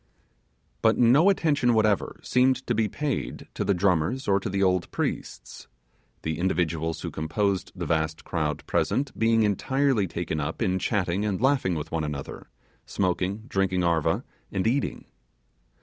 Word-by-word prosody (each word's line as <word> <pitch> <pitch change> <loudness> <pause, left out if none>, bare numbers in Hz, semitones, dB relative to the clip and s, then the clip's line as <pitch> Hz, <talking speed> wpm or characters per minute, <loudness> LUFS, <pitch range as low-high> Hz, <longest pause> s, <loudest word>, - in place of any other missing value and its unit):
But 110 0 +4
no 135 +10 +5
attention 145 -10 +2
whatever 110 -3 +1
seemed 130 +1 +2
to 120 - 0
be 110 -1 +1
paid 145 +4 -3
to - - -2
the 100 - +1
drummers 90 - +1
or 100 -1 +3
to 100 - -4
the 100 +1 0
old 90 -2 +1
priests; - - -4 0.6
the 80 0 -2
individuals 85 -3 -1
who - - -4
composed 95 +5 -1
the - - -4
vast 80 0 -1
crowd 75 -3 -2
present 140 +2 0
being 115 0 +3
entirely 120 +2 +1
taken 85 -2 -3
up 75 +2 -3
in 95 0 +1
chanting 95 -2 0
and 105 -3 -1
laughing 130 -8 +2
with 80 0 -5
one 80 -1 -1
another, 75 -2 -6 0.4
smoking, 95 +2 -1
drinking 95 -3 0
'arva', 85 -3 +1 0.3
and 95 - -1
eating. 130 +5 -1
95 Hz, 150 wpm, -26 LUFS, 85-115 Hz, 0.6 s, no